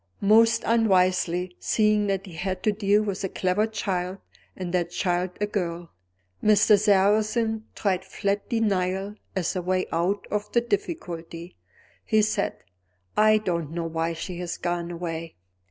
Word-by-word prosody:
Most 225 +3 +5
unwisely 185 -5 +2
(seeing 210 -1 +2
that 195 0 -1
he 185 - -11
had 185 +3 -3
to 215 - +3
deal 205 0 +2
with 200 -2 -3
a 195 - -1
clever 185 +5 +1
child, 190 -4 -2 0.4
and 180 -1 -5
that 175 -2 +1
child 175 +1 0
a 205 - +1
girl), 175 -4 -3 0.5
Mr. 210 0 +6
Sarrazin 215 +2 +2
tried 190 -3 0
flat 200 0 -2
denial 195 -3 0 0.2
as 185 -2 -1
a 185 - -1
way 185 +1 0
out 180 +5 0
of 210 0 -2
the 235 - +4
difficulty. 180 - -4 0.5
He 215 -1 +3
said: 210 -1 -1 0.5
"I 215 0 +5
don't 170 -7 -2
know 170 -1 -2
why 165 0 -1
she 170 +2 -6
has 175 -1 -4
gone 175 -1 -2
away." 165 -1 -5
190 Hz, 150 wpm, -25 LUFS, 175-210 Hz, 0.5 s, Mr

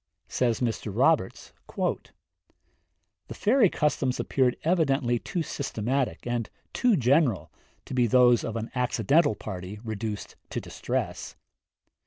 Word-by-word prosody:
Says 120 -2 0
Mr. 115 -3 -2
Roberts: 130 0 +1
'The - - -8
fairy 225 -2 +4
customs 140 -5 0
appeared 130 -3 +1
evidently 140 -8 +2
too 170 +7 -3
systematic, 130 -2 -2
and 120 -2 -2 0.2
too 245 -5 +3
general, 130 - +2 0.3
to - - -8
be 125 -2 +3
those 125 0 +5
of 115 - -4
an 115 0 -4
accidental 125 - +2
party 95 +2 -7
reduced 110 -1 -5
to - - -3
distress. - - -4
125 Hz, 115 wpm, -27 LUFS, 115-140 Hz, 0.3 s, those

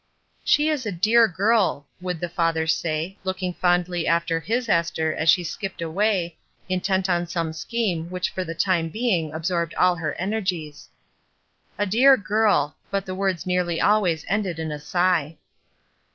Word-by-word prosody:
''She 295 +1 +3
is 270 -7 -2
a - - -1
dear 220 +6 +4
girl," 200 -5 +1 0.2
would 180 -2 -3
the 175 - -2
father 165 -2 0
say, 160 +3 -1
looking 185 -1 -3
fondly 175 -1 0
after 170 0 +1
his 235 +7 -2
Esther 165 -4 +1
as 155 - 0
she 180 +2 +5
skipped 195 +3 -5
away, 175 0 0 0.3
intent 190 0 0
upon 175 -1 0
some 165 -1 -2
scheme 175 -2 -2
which 180 0 -2
for 185 - -3
the 165 -2 -6
time 170 -2 +1
being 185 -7 0
absorbed 170 +1 -2
all 180 -1 +3
her 155 -2 -3
energies. 185 -6 -3 0.9
''A 205 - +1
dear 260 +7 +6
girl," 200 - +1
but 195 0 -2
the 185 - -5
words 190 -2 -1
nearly 180 -2 0
always 185 -7 +2
ended 195 -4 -1
in 160 -1 -4
a 150 - -5
sigh. 170 -1 0
180 Hz, 160 wpm, -23 LUFS, 165-195 Hz, 0.9 s, dear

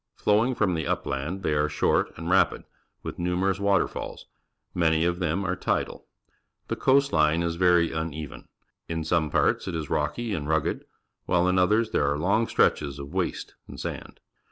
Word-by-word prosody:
Flowing 110 +5 +2
from 95 -5 +1
the 80 -2 -2
upland, 80 +9 -3
they 75 - +1
are 75 0 +1
short - - +1
and 80 - -6
rapid, 95 +1 +2 0.4
with - - -6
numerous 90 +2 0
waterfalls; 100 -1 -1 0.5
man}' 80 -2 +2
of 85 +1 0
them 90 +2 -1
are 90 -1 0
tidal. - - -2 0.6
The - - -1
coast 140 +1 +3
line 80 +2 +3
is 85 -1 -1
very 85 -1 +3
une\en. 80 -2 -5 0.4
In 80 -1 -2
some 80 -1 +1
parts - - +1
it 90 - -3
is 80 -3 -4
rocky 120 -3 -1
and 75 -5 -3
rugged, 80 -2 0 0.4
while 90 0 +2
in 90 0 +2
others 105 +5 +2
there 70 - +2
are 70 - 0
long 100 +8 +1
stretches 70 -2 +1
of 70 0 -8
waste - - -2
and - - -10
sand. - - -6
85 Hz, 175 wpm, -26 LUFS, 80-95 Hz, 0.6 s, coast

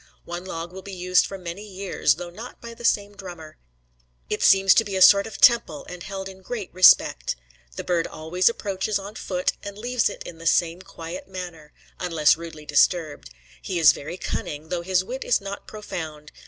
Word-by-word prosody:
One 175 +1 -6
log 170 -2 -5
will 190 - -8
be 195 0 -8
used 180 0 +2
for 195 - -7
many 180 +1 -7
years, 195 -7 0
though 175 +1 -7
not 225 +7 -10
by 235 0 -9
the 235 +1 -13
same 205 -2 +1
drummer. 175 -6 -10 0.7
It - - -1
seems 195 -1 +6
to 225 - +4
be 200 -3 -5
a - - +1
sort 200 +2 +7
of 205 -3 -8
temple 230 -11 +4
and 180 -1 -9
held 195 +1 -6
in 190 0 -11
great 205 0 -6
respect. 180 - +5 0.4
The - - -5
bird 170 -2 0
always 170 +5 +1
approaches 200 -2 -2
on 200 +1 -8
foot, 185 -4 -1
and 200 0 -8
leaves 245 +2 0
it - - -8
in 165 - -10
the 165 - -4
same 170 +1 +2
quiet 165 -1 -8
manner, 175 -5 -8 0.3
unless 165 -5 +3
rudely 160 -2 -10
disturbed. 150 - +1 0.3
He 185 - -3
is 160 -3 +7
very 155 +5 -7
cunning, 155 -3 -5
though 180 -1 -2
his 185 +1 +1
wit 255 +7 -5
is - - +2
not 200 0 -7
profound. 160 -8 -7
185 Hz, 195 wpm, -24 LUFS, 165-200 Hz, 0.7 s, sort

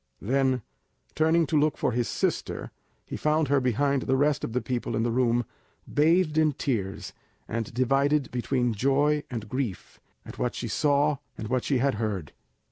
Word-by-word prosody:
Then, 130 +1 +1 0.5
turning 160 +1 +3
to 155 -1 +2
look 150 0 +1
for - - 0
his 120 0 0
sister, - - -2 0.3
he - - -6
found 155 -1 +1
her 140 -1 +4
behind 135 +2 +1
the 130 +1 +1
rest 145 +1 +2
of - - -3
the 125 - 0
people 120 -2 -3
in 110 - +1
the 120 - 0
room, 120 -1 +2 0.4
bathed 160 +1 +3
in 155 -2 +3
tears, 110 -9 -3 0.3
and 115 -1 -3
divided 135 +3 +1
between 125 -1 0
joy 140 +6 +2
and 115 -3 -5
grief 120 -6 -4 0.3
at - - -10
what - - -1
she - - -4
saw 145 0 +2 0.2
and 110 -1 -5
what 130 -1 0
she 140 - +1
had 135 +2 +2
heard. 100 -8 -3
130 Hz, 175 wpm, -27 LUFS, 120-145 Hz, 0.5 s, her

